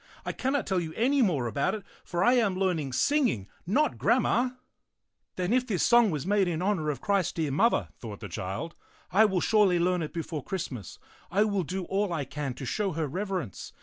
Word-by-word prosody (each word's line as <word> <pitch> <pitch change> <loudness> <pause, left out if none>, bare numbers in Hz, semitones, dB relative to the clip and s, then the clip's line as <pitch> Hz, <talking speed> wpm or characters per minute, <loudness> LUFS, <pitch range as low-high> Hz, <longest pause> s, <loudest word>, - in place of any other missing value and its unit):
I - - -1
can 265 +2 -2
not 285 - 0
tell 190 -2 +1
you 160 -2 -4
any 270 +4 +2
more 165 - +2
about 140 - 0
it, 210 - -7 0.2
for 175 0 -1
I 245 - +5
am 220 -7 +2
learning 180 -7 0
singing, 230 - +1 0.2
not 290 +11 +1
grammar." 250 +1 +2 0.8
"Then 185 +4 0
if 250 0 +2
this 190 -7 0
song 235 -2 +5
was 150 -5 -3
made 200 -1 +2
in 165 -2 -1
honor 180 -5 0
of 145 - -3
Christ's 200 -4 +1
dear 155 -4 -1
Mother," 225 - +2
thought 105 -4 -7
the - - -7
child, 100 - -5 0.2
" - - -31
I 215 +4 +6
will 190 -4 +1
surely 210 -5 +4
learn 180 +1 +1
it 155 - -4
before 160 -4 -4
Christmas. 135 - -5 0.3
I 200 +4 +3
will 200 -3 0
do 185 +3 -3
all 195 +1 0
I 155 -5 -2
can 140 -1 -4
to 135 - -7
show 195 - -1
her 160 0 -1
reverence. 185 - -4
185 Hz, 215 wpm, -28 LUFS, 155-210 Hz, 0.8 s, I